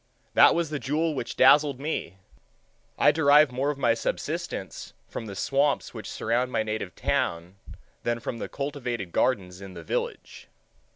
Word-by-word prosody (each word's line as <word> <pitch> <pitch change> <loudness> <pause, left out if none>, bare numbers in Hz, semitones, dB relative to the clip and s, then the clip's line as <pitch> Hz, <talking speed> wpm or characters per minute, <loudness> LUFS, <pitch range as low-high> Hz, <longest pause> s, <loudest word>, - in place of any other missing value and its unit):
That - - +7
was 170 -2 -1
the 150 - -2
jewel 155 +4 0
which 120 -5 -4
dazzled 140 0 +5
me. 140 - -4 0.8
I - - +5
derive 150 -2 +5
more 130 +3 -1
of 145 - -2
my 120 -4 +3
subsistence 115 - -4
from 115 - -6
the 100 - -7
swamps 140 +7 0
which 110 -2 -7
surround 120 +3 -1
my 110 - +1
native 110 -4 -4
town 85 +3 -1 0.4
than 120 0 -1
from 115 0 -5
the - - -5
cultivated 125 -9 -4
gardens 95 -7 0
in 95 -2 -10
the 85 - -8
village. - - -4
125 Hz, 160 wpm, -26 LUFS, 110-145 Hz, 0.8 s, That